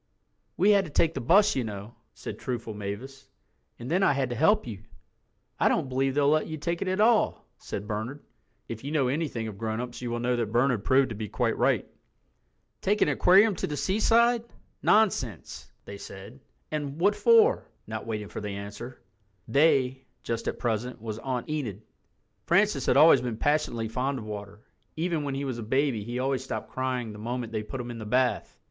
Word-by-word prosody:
"We 200 +4 +5
had 200 -2 +4
to - - -8
take 160 +2 +2
the 135 - -4
bus, 200 - +4
you 130 - 0
know," 105 0 -7 0.2
said - - -7
truthful 115 -3 -4
Mavis, 115 +7 -7 0.5
"and 120 +4 -7
then 180 +3 +2
I 195 - +4
had 135 -2 -1
to - - -2
help 160 - +3
you." 105 -5 -7 0.8
"I - - +4
don't 130 - 0
believe 135 +1 0
they'll 145 -1 +3
let 155 +1 +3
you 155 - -5
take 170 +3 -3
it 195 - -2
at 185 +2 -1
all," 220 +1 +3
said 100 - -6
Bernard—if 110 - -8
you 140 - -4
know 140 -5 +2
anything 135 -6 -2
of 100 -2 -8
grown 110 0 -2
ups 125 0 -6
you 120 - -3
will 120 0 -2
know 125 +1 +1
that 115 -3 -2
Bernard 120 -2 +2
proved 130 +2 +3
to 115 - -5
be 105 0 -5
quite - - 0
right. - - +1 0.9
"Take 210 +2 +2
an - - +1
aquarium 190 +8 +5
to - - -2
the 150 - -4
seaside—nonsense!" 220 - +1
they 100 0 -9
said. 100 +8 -10 0.3
And 145 -1 -4
"What 200 +4 +3
for?" 460 - +4 0.2
not 110 0 -6
waiting 105 -2 -3
for - - -6
the 105 - -4
answer. 105 +5 -8 0.4
"They," 135 -3 +3 0.2
just 115 -1 -3
at - - -2
present, 120 +1 -2
was 110 0 -6
Aunt 125 -2 -3
Enid. 120 -10 -4 0.6
Francis - - +2
had - - +4
always - - +7
been 120 -3 -3
passionately 135 -5 0
fond 130 +4 -2
of 110 - -7
water. 105 -1 -7 0.3
Even 165 -1 -1
when 140 -2 -3
he 140 +1 -3
was 130 -3 -4
a - - -4
baby 130 0 0
he 120 +3 -5
always 130 +1 -1
stopped 135 - -5
crying 125 -4 -2
the 105 - -10
moment 120 +1 -4
they 110 -1 -2
put 130 +5 -7
him 120 0 -5
in 115 - -7
the 110 - -6
bath. 125 +2 0
130 Hz, 200 wpm, -27 LUFS, 110-150 Hz, 0.9 s, always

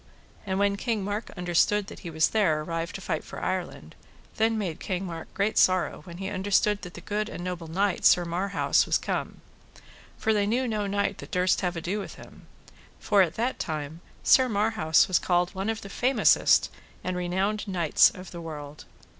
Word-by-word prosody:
And 190 0 -1
when 200 0 +2
King 220 -2 -1
Mark 205 +3 -3
understood 180 +4 +2
that - - -10
he 175 - -7
was 160 0 +2
there 175 -9 +2
arrived 165 +1 -4
to - - -6
fight - - -2
for - - -9
Ireland, - - -4 0.4
then 225 0 +2
made 185 -7 -3
King 190 -1 -3
Mark 165 -2 -7
great 200 +2 +1
sorrow 185 -4 +2
when 170 -1 -9
he 190 +1 -4
understood 205 +1 +1
that 180 -1 -9
the 175 - -9
good 210 +2 -2
and 175 - -7
noble 180 -2 -5
knight 190 +4 0
Sir 175 - +5
Marhaus 185 +4 +1
was - - +3
come. - - -4 0.8
For 220 - +1
they 205 -1 +1
knew 250 +4 0
no 210 -3 -1
knight 200 0 -1
that - - -9
durst 180 0 +1
have 180 -2 -1
ado 175 +5 -3
with 200 - -7
him. - - -15 0.5
For 205 -2 +3
at 170 -3 +1
that 240 +3 -1
time 155 +1 -4 0.2
Sir 260 -1 +5
Marhaus 210 -6 +2
was 185 - +2
called 175 0 +1
one 195 +3 -3
of 225 0 -2
the - - -8
famousest 250 +6 +3 0.3
and 185 0 -2
renowned 190 +4 -1
knights 175 -5 +4
of 185 0 -11
the 170 - -7
world. 150 -2 -8
190 Hz, 195 wpm, -27 LUFS, 175-210 Hz, 0.8 s, Sir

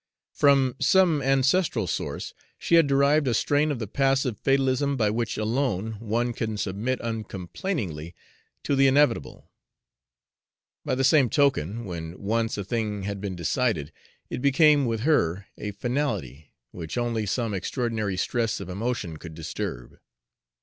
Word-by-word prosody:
From 135 -3 +3
some 180 -6 +4
ancestral 135 - +2
source - - -4 0.2
she - - -3
had 165 -3 +6
derived 140 +1 +3
a 120 - +2
strain 145 +5 +2
of 140 - -2
the 115 - -4
passive 135 +1 +1
fatalism 135 0 +1
by 105 -4 +2
which 115 0 -2
alone 110 -2 -1
one 115 +2 -1
can 110 -2 -3
submit 105 +6 -2
uncomplainingly 100 - -4 0.5
to 140 - +1
the 135 0 +5
inevitable. 135 -2 +1 1.3
By - - -1
the 135 - 0
same 135 -2 +5
token, 120 - +1
when 85 -2 -6
once 115 +2 -1
a 100 - -3
thing 105 -1 -2
had 100 0 -4
been 100 -2 -4
decided, 85 - -1 0.4
it - - -5
became 140 0 +4
with 115 -1 -1
her 100 - +1
a 105 - -5
finality, 100 - -3 0.2
which 85 +4 -6
only 115 -3 -1
some 115 +1 -1
extraordinary 110 -1 -2
stress 115 +3 -1
of - - -7
emotion 100 -4 -3
could 80 0 -10
disturb. 70 -5 -6
115 Hz, 145 wpm, -26 LUFS, 100-135 Hz, 1.3 s, had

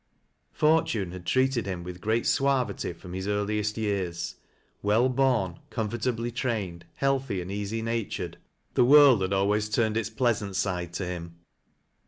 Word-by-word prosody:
Fortune 150 - +2
had 90 -1 -9
treated 130 -4 +2
him 90 -3 -4
with 90 0 -8
great 110 +2 0
suavity 135 -9 +1
from 90 +1 -11
his 95 +1 -4
earliest 105 +1 -1
years. 90 -5 -2 0.4
Well 110 +5 +3
born 125 -9 +1
comfortably 115 +1 -2
trained, 110 -8 -3
healthy 135 -7 0
and 90 +1 -5
easy 105 +3 -3
natured, 115 -2 -3 0.4
the - - +4
wiuld 135 -4 +7
had 95 0 -1
always 105 +2 +1
turned 110 0 +1
its 110 -2 -1
pleasant 110 -4 0
side 90 -4 -1
to 90 +2 -3
him. 85 -2 -6
105 Hz, 145 wpm, -27 LUFS, 95-120 Hz, 0.4 s, wiuld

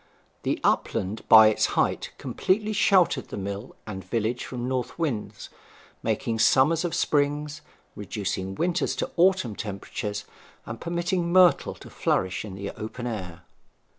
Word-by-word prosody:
The - - -1
upland 100 +4 0
by 110 -1 +9
its 110 - +1
height - - +1
completely 210 +3 0
sheltered 185 -8 +3
the - - -7
mill 100 +3 -5
and 95 -3 -6
village 115 +5 -2
from 125 -1 -5
north 130 -1 -3
winds, 145 -11 -3 0.5
making 115 -1 -1
summers 145 +8 +4
of 175 - -2
springs, 150 +1 0 0.3
reducing 95 -2 -4
winters 175 - 0
to - - -3
autumn 180 - +3
temperatures, 105 0 -5 0.4
and 115 0 -7
permitting 170 +1 -1
myrtle 180 -1 +5
to - - -13
flourish 95 0 0
in 100 -3 -8
the 100 +1 -5
open 110 +3 -7
air. 95 -8 -5
120 Hz, 135 wpm, -26 LUFS, 105-170 Hz, 0.5 s, by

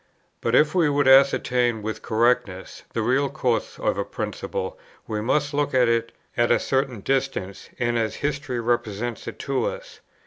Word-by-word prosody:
But 115 +1 +1
if 150 +2 +4
we 170 -5 +3
would 145 -1 +2
ascertain 125 -4 +4
with 110 0 -4
correctness 110 -5 0
the 115 - -1
real 135 +4 +2
course 120 -3 -1
of - - -1
a - - +1
principle, - - -5 0.3
we 105 -1 -3
must 145 +6 0
look 145 -1 0
at 125 -2 +5
it 115 0 +1 0.2
at 120 0 +2
a - - +5
certain 130 -5 -1
distance, 135 -7 -2
and 120 -1 0
as 110 -1 -1
history 140 -3 -2
represents 120 -1 -2
it - - -6
to - - -1
us. - - -7
125 Hz, 170 wpm, -24 LUFS, 115-140 Hz, 0.3 s, at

